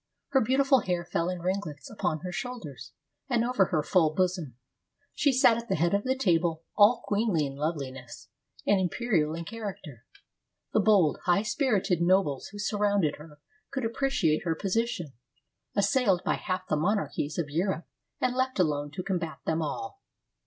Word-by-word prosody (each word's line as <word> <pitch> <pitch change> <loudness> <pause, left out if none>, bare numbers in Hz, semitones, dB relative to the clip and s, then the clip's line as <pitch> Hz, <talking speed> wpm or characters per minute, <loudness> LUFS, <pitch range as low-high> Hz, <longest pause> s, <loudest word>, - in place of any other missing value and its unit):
Her 270 -2 +3
beautiful 265 +3 +4
hair 180 -4 -2
fell 170 0 -1
in 180 -2 -4
ring 190 +2 0
lets 150 -3 -9
upon 160 -8 -2
her 180 - -5
shoulders 175 - -6 0.4
and 235 -2 +2
over 240 -6 +3
her 155 -4 0
full 155 -2 +2
bosom. 180 -8 -1 0.6
She 290 - +2
sat 250 -3 +5
at 235 0 -7
the - - +2
head 170 +3 +1
of 200 +3 +1
the 260 0 +1
table 170 -7 +1
all 220 +4 +5
queenly 205 -7 +1
in 135 -1 -6
loveliness, 135 - -5 0.4
and 205 - +4
imperial 180 -5 0
in 170 0 -5
character. 190 - -7 0.7
The - - +4
bold, 195 -7 +4
high 180 +3 +3
spirited 215 - +1
nobles 170 -6 +2
who 205 - -11
surrounded 205 -6 +1
her 150 -1 -14 0.3
could 265 -3 -3
appreciate 225 - +1
her 165 -2 0
position, 195 - -2 0.6
as 200 -1 +3
sailed 205 -8 +2
by - - +2
half 185 0 -3
the 155 - +1
monarchies 155 -4 -1
of 155 -4 -2
Europe, 175 +2 -1 0.3
and 250 0 0
left 260 0 0
alone 145 -5 +1
to 180 - -4
combat 165 -6 -3
them 160 +1 0
all. 265 - -5
185 Hz, 170 wpm, -28 LUFS, 155-225 Hz, 0.7 s, sat